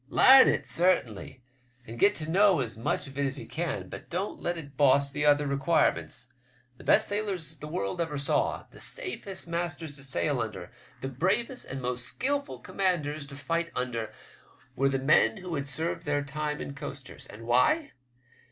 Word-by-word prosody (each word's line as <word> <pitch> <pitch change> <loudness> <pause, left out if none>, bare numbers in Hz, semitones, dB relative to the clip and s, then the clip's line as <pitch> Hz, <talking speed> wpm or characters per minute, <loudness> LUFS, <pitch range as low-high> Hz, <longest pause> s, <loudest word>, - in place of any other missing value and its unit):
Larn 265 - +8
it - - +1
sartinly, 130 - 0 0.4
and 115 +1 -9
get 205 +1 +5
to 155 - -4
know 195 +1 +4
as 115 -3 -4
much 115 - -1
of 135 0 -8
it 140 - +2
as 135 +1 -4
ye - - -7
can, 170 -2 -3
but - - -9
don't 185 +4 -3
let 175 0 -1
it 140 -4 -9
boss 140 0 +4
the 150 +1 -1
other 145 0 +5
requirements. 130 - 0 0.4
The - - -13
best - - +4
sailors 195 -6 -2
the 150 - -8
world 150 - -2
ever 155 -3 -2
saw, 140 - 0
the - - -14
safest 195 - -5
masters 165 -3 -3
to 135 - -8
sail 140 0 0
under, 100 -6 -6 0.3
the 135 - -3
bravest 190 - 0
and 135 -1 -6
most 125 0 -1
skilful 280 +2 -2
commanders 155 -6 -1
to 140 - -10
fight 165 +4 -1
under, 120 -3 -2 0.6
were 135 +1 +2
the 135 - 0
men 130 -4 +4
who 180 -1 -6
had 140 -2 -2
served 160 +5 -2
their 145 -1 +1
time 150 +1 -3
in 140 - -5
coasters; 140 -1 -8
and 110 +2 -10
why? 125 - +3
145 Hz, 180 wpm, -28 LUFS, 135-170 Hz, 0.6 s, Larn